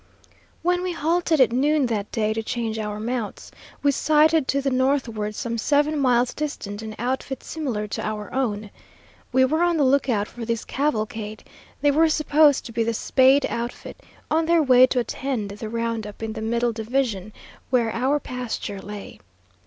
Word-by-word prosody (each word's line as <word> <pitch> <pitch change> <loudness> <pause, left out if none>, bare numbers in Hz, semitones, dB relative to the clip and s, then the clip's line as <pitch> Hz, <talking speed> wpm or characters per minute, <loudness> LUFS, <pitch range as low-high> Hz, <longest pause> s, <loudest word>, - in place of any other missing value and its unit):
When 355 +1 +2
we 365 -1 -2
halted 330 0 +1
at 255 -3 +5
noon 285 +3 +2
that 215 -4 -2
day 215 -1 0
to 225 - -2
change 225 -1 -3
our 210 -1 -4
mounts, 230 -1 -4 0.3
we 285 - +4
sighted 310 +1 +3
to 275 - +1
the 275 -1 -1
northward 255 -5 0
some 230 +1 -3
seven 295 +4 +2
miles 250 -2 +2
distant 220 -9 -5
an 220 -1 -7
outfit 260 +2 -3
similar 250 -10 -3
to - - -3
our 210 -1 -4
own. 215 -6 -2 0.6
We 260 0 +4
were 315 +5 0
on 345 -1 +3
the 295 - +3
lookout 255 -6 +2
for 240 - -9
this 230 0 -2
cavalcade; 220 -6 -2 0.4
they 290 0 +4
were 320 +3 +4
supposed 305 -2 +3
to - - -7
be 230 0 0
the 230 0 -1
"Spade" 265 +4 +4
outfit, 235 +1 -5 0.3
on 320 +1 +2
their 335 -1 +4
way 255 -2 +7
to 255 - -2
attend 240 -3 -2
the 210 +2 -6
round 230 -1 -2
up 210 +2 -10
in 220 -1 -3
the 220 - -6
middle 235 +2 0
division, 220 -3 -2 0.4
where 240 -3 +2
our 265 +6 +1
pasture 245 -7 -5
lay. 205 0 -9
245 Hz, 175 wpm, -23 LUFS, 220-285 Hz, 0.6 s, way